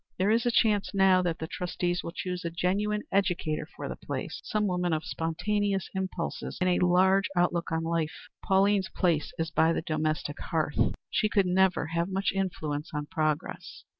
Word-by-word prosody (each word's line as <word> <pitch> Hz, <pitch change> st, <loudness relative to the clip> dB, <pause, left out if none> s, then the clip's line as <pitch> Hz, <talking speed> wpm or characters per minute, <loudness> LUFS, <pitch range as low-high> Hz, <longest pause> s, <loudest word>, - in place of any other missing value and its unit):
There 190 Hz, +3 st, +2 dB
is 230 Hz, +2 st, +2 dB
a -, -, +3 dB
chance 210 Hz, -4 st, +2 dB
now 190 Hz, -1 st, +5 dB
that 175 Hz, -2 st, -1 dB
the 160 Hz, -, -4 dB
trustees 175 Hz, +1 st, -2 dB
will 170 Hz, -, -5 dB
choose 180 Hz, 0 st, -4 dB
a 170 Hz, -, -1 dB
genuine 200 Hz, +5 st, 0 dB
educator 170 Hz, -6 st, 0 dB
for -, -, -7 dB
the -, -, -5 dB
place -, -, -5 dB
some 215 Hz, -2 st, 0 dB
woman 180 Hz, -3 st, 0 dB
of 155 Hz, 0 st, -1 dB
spontaneous 195 Hz, +4 st, -1 dB
impulses 190 Hz, -3 st, -3 dB
and 185 Hz, -, +2 dB
a 180 Hz, -, +2 dB
large 190 Hz, +2 st, +4 dB
outlook 175 Hz, -1 st, +1 dB
on 160 Hz, 0 st, 0 dB
life. 165 Hz, -1 st, -2 dB, 0.2 s
Pauline's 195 Hz, 0 st, +3 dB
place 165 Hz, -5 st, 0 dB
is 165 Hz, 0 st, -2 dB
by 165 Hz, 0 st, +3 dB
the -, -, -2 dB
domestic 155 Hz, -2 st, -2 dB
hearth. 155 Hz, -3 st, 0 dB, 0.2 s
She 215 Hz, -, +2 dB
could 200 Hz, -2 st, +3 dB
never 185 Hz, -2 st, +3 dB
have 170 Hz, +2 st, 0 dB
much 195 Hz, +1 st, 0 dB
influence 160 Hz, -6 st, -2 dB
on 150 Hz, 0 st, -2 dB
progress." 155 Hz, -4 st, -2 dB
180 Hz, 180 wpm, -28 LUFS, 165-195 Hz, 0.2 s, now